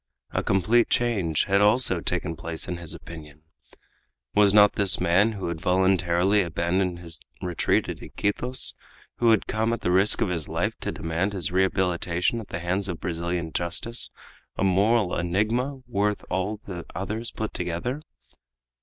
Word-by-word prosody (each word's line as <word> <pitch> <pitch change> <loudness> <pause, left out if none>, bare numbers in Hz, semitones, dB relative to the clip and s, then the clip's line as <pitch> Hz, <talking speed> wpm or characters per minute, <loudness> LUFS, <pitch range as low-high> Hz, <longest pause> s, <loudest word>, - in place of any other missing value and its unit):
A - - 0
complete 110 +6 +2
change 100 -11 +1
had 100 0 +2
also 105 -3 +4
taken 85 -1 -2
place 80 0 -4
in 90 - -3
his 85 -2 -4
opinion. 75 -2 -11 0.9
Was 105 -1 +5
not 105 0 +6
this 100 -2 +1
man, 90 +6 +3
who 95 -4 -4
had 80 -2 -5
voluntarily 95 +1 +2
abandoned 85 +1 -1
his 85 -2 -7 0.2
retreat 90 -2 0
at - - -6
Iquitos, 125 +5 -1 0.4
who 120 - +3
had 110 -3 +3
come 110 +2 0
at 115 - -4
the 90 - 0
risk 95 +3 +5
of - - +2
his 85 -4 -2
life - - -1
to - - -3
demand 85 +5 -2
his 95 -2 -2
rehabilitation 90 +1 +1
at 110 - -8
the 85 - -5
hands 90 +3 0
of 85 - -4
Brazilian 85 -1 -3
justice, 90 +7 -1 0.5
a - - 0
moral 100 +1 +2
enigma 110 +10 -1
worth 105 -3 -1
all 95 +3 -1
the 90 -3 -6
others 110 +6 -2
put 110 -1 -5
together? 90 - -3
95 Hz, 160 wpm, -25 LUFS, 85-105 Hz, 0.9 s, not